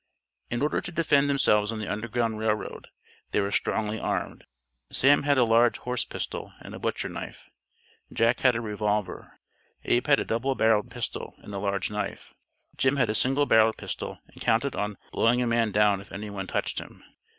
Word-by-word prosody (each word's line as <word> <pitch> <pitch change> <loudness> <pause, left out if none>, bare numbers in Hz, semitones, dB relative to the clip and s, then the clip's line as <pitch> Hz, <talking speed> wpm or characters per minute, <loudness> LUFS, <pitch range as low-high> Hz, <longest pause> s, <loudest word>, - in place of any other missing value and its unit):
In 120 +3 -1
order 150 - +1
to 175 - -6
defend 145 -4 +2
themselves 105 -6 +3
on 115 - -4
the 110 - -4
Underground 115 +1 -2
Rail 110 -1 +2
Road, - - -8 0.4
they - - +1
were 100 0 0
strongly 110 +1 0
armed. - - -3 0.5
Sam 145 +2 +5
had 145 -1 +2
a 125 - +5
large 115 +1 +4
horse 125 0 -2
pistol - - -5
and - - -10
a - - -7
butcher - - -2
knife; - - -8 0.6
Jack 115 +1 +2
had 125 -2 +4
a 115 - -1
revolver; 105 -3 -3 0.4
Abe 120 - +1
had 140 -1 +5
a - - -2
double 130 +4 -1
barrelled 110 0 +2
pistol 120 -1 -5
and 105 - -9
a 100 - -3
large 100 0 -1
knife; 105 0 -5 0.4
Jim 135 +1 +2
had 125 -5 +2
a - - -2
single 135 +5 +2
barrelled 110 -3 +4
pistol - - -5
and - - -17
counted 125 +5 +1
on 105 0 -3
"blowing 120 +2 +3
a 125 - +1
man 115 -2 +1
down 105 -1 +3
if 100 - -16
any 105 +2 -6
one 95 -2 -5
touched" - - -1
him. - - -12
115 Hz, 195 wpm, -27 LUFS, 105-125 Hz, 0.6 s, Sam